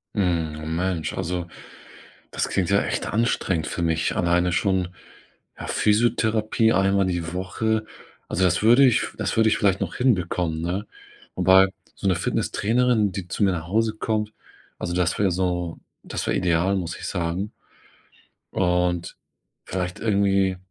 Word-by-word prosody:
Mhm, 80 -5 -1
Mensch, 90 -2 -1
also, 90 -1 -2 0.8
das - - -1
klingt 95 -2 0
ja 100 0 +4
echt - - -2
anstrengend 95 -7 0
für - - -3
mich 80 -1 0
alleine 90 0 +2
schon, 95 -1 +1 0.7
ja, - - -6
Physiotherapie 110 0 +2
einmal 95 0 +3
die 85 -2 -3
Woche. 110 +4 -1 0.4
Also, 95 - 0
das 90 0 +2
würde 120 +5 +7
ich 125 -3 +3
das - - -2
würde 110 -1 +5
ich - - +2
vielleicht 95 -1 +2
noch 95 -4 -3
hinbekommen, 90 -9 0
ne? 90 +5 -2 0.5
Wobei 95 +1 +6 0.3
so - - -3
'ne 95 - +3
Fitnesstrainerin, 110 +4 +1
die 95 -2 -6
zu 90 - -1
mir 95 - +4
nach 80 -2 -5
Hause 110 +3 +1
kommt, 110 -1 -2 0.5
also 85 - -3
das 90 -1 +1
wäre 100 -3 +3
so 90 -2 -2 0.2
das - - -4
wäre - - +1
ideal, 90 +2 +1
muss 85 -3 -3
ich - - -6
sagen. 90 +3 -2 1.0
Und 90 -1 0 0.5
vielleicht 90 -1 -4
irgendwie 100 -3 +2
95 Hz, 150 wpm, -24 LUFS, 85-105 Hz, 1.0 s, würde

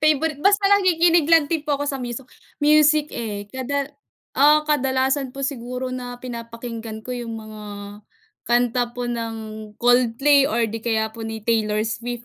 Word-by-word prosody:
favorite. 305 -1 +2
Basta 400 +3 +3
nakikinig 345 -5 +4
lang 330 -2 +6
din 325 0 -1
po 295 -2 0
ako 290 - -3
sa 275 -2 -2
miso 245 +1 -5 0.3
music, 300 0 +4
eh, 210 -3 -4
kada 280 +2 -3 0.4
ah, 300 +2 +5
kadalasan 265 -1 +1
po 275 - -8
siguro 255 -1 -4
na 245 -1 -6
pinapakinggan 230 -2 -7
ko 250 - -5
'yong 240 -2 -5
mga 215 -1 -10 0.9
kanta 245 0 +2
po 245 - -3
ng 230 -1 -3 0.4
Coldplay 250 +4 +4
or 230 +1 +1
'di 225 +1 -5
kaya 220 -2 0
po 230 - -11
ni 220 0 -5
Taylor 215 -2 +1
Swift, 235 +2 -4
250 Hz, 155 wpm, -22 LUFS, 230-290 Hz, 0.9 s, lang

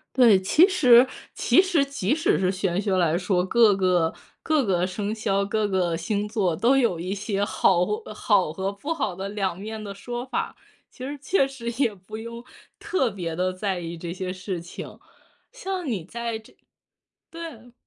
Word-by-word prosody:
对， 230 -7 +6
其 300 - +5
实 255 -10 +6 0.3
其 365 - +4
实 350 -7 +2
即 275 -4 -1
使 325 +2 +2
是 185 - +2
玄 190 -1 -1
学 195 -2 0
来 170 -3 +2
说， 180 0 +1
各 210 0 +4
个 180 -4 +2 0.3
各 310 -4 +2
个 180 -3 +1
生 200 +3 -3
肖， 200 -3 0
各 210 +1 0
个 180 -4 0
星 205 +5 -2
座 195 -7 0
都 255 +4 +3
有 230 -10 +2
一 185 +3 -3
些 200 0 -1
好 180 -3 +3
或 210 +3 -3
好 200 -7 +2
和 190 +4 -3
不 280 +11 -4
好 215 - -2
的 195 +2 -5
两 195 -4 -2
面 215 +2 -6
的 200 -1 -6
说 240 +5 -5
法， - - -3 0.3
其 255 - -9
实 285 +2 -4
确 325 -2 +2
实 250 -4 -5
也 230 -5 +1
不 195 +3 -10
用 235 +1 -7 0.4
特 265 -10 0
别 170 -5 -5
地 185 +1 0
在 190 0 -2
意 170 0 -6
这 170 +1 -6
些 185 0 -4
事 185 -1 -5
情， 170 +1 -9 0.5
像 385 -8 -4
你 210 - -2
在 230 +4 -4
这 220 - -19 0.8
对。 285 -9 -9
205 Hz, 200 characters per minute, -25 LUFS, 185-240 Hz, 0.8 s, 对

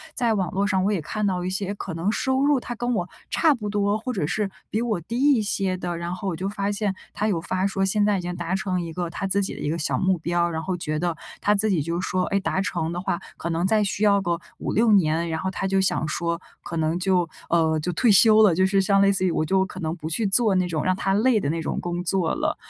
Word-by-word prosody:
在 235 -2 +1
网 190 -5 -1
络 195 +2 +1
上 195 -2 +1
我 210 - +2
也 185 - -1
看 210 +7 -3
到 180 -2 -1
一 180 - -2
些， 190 +1 -2
可 190 -3 -6
能 165 +5 -1
收 265 +3 0
入 290 -1 +4
他 245 - -6
跟 245 +1 -2
我 180 -6 -1 0.2
差 320 -2 +3
不 215 -6 -5
多， 205 0 +1
或 250 +3 -4
者 185 -8 -1
是 205 +5 -1 0.2
比 220 - -1
我 220 -7 -1
低 230 +9 -4
一 235 - +2
些 195 -2 0
的， 175 -1 -4
然 170 +1 -4
后 190 +2 -4
我 170 - -3
就 190 - -3
发 200 0 -2
现 200 -1 -1 0.2
他 215 - -1
有 175 -6 0
发 185 +2 -1
说， 195 0 -1
现 205 +2 +2
在 205 -1 +2
已 - - -3
经 180 0 -4
达 185 - -2
成 190 -3 -1
一 165 -1 -6
个 175 0 -3
他 195 +3 -4
自 200 +1 +1
己 - - -3
的 - - -9
一 - - -2
个 165 - -1
小 155 - -1
目 190 -1 +2
标。 170 +1 0
然 160 -1 -4
后 185 -1 -2
觉 155 -2 -3
得 175 -1 -1 0.3
他 205 - +3
自 215 +1 +2
己 180 -6 +1
就 170 +3 -2
说： 185 0 -1
“哎， 200 - +3
达 190 -1 -1
成 170 -4 -2
的 175 - -3
话， 175 - -2 0.2
可 170 - -4
能 170 +2 0
再 215 +1 +3
需 200 +1 -1
要 200 -1 +4
个 170 -2 -1 0.2
5-6 225 +1 +1
年”， 170 -3 +2
然 160 0 -2
后 190 - -2
他 195 - -2
就 195 0 +2
想 170 -4 +1
说， 170 +2 -2 0.2
可 170 - -5
能 160 +1 0
就 180 -2 +1 0.2
呃， 160 -2 +2
就 180 +4 -2
退 225 +7 +3
休 215 +2 +7
了， 200 -5 +5
就 185 +2 +3
是 195 0 +2
像 195 0 +3
类 200 0 +5
似 190 -1 +1
于 180 - +2
我 155 - 0
就 190 +3 +2
可 185 - -9
能 160 -2 -2
不 160 -3 -7
去 210 +7 +1
做 215 +1 +4
那 185 -1 +1
种 160 -3 -2
让 185 0 +1
他 195 +1 -1
累 225 +2 +3
的 140 - -2
那 165 +2 -1
种 - - -3
工 175 0 -3
作 180 -1 0
了。 - - -1
190 Hz, 305 characters per minute, -24 LUFS, 170-205 Hz, 0.3 s, 休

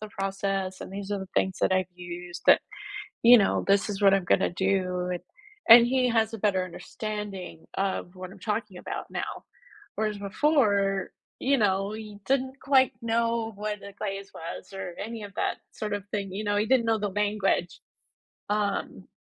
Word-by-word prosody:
the 215 - -7
process 195 -1 -2
and - - -8
these 200 0 -6
are 200 - -1
the 190 - -7
things 190 -1 +1
that - - +3
I've 185 -1 +1
used." 175 0 -8
That - - +8 0.6
you 240 +1 +10
know, 200 - +2
"This 200 +1 +3
is 200 0 -4
what 195 -1 +6
I'm 195 -1 +3
gonna - - +3
do," 180 -1 0
and 180 - -3 0.5
and 235 +1 +11
he 255 0 +2
has 225 -1 +2
a - - -3
better 190 -3 +2
understanding 200 -2 -6
of 190 -2 -2
what 185 0 -8
I'm 195 - -13
talking 210 -1 -3
about - - -6
now. - - -3 0.6
Whereas 215 -1 -1
before, 200 -4 +2 0.3
you 275 +1 +2
know, 195 -2 +1
he 215 -2 -8
didn't 265 0 0
quite 265 -1 +4
know 230 0 0
what 210 0 -3
the 200 - -10
glaze 195 -1 -4
was 170 +3 -8
or 185 -2 -6
any 225 +1 -5
of 200 -1 -9
that - - -1
sort 210 -1 -4
of 205 -1 -3
thing, 200 -2 -3
you 205 +3 -3
know, 205 -1 0
he 210 - +2
didn't 245 0 +3
know 225 -1 +2
the 205 0 -1
language. 205 -3 0 0.7
Um, 205 -2 -1
200 Hz, 185 wpm, -27 LUFS, 190-220 Hz, 0.7 s, and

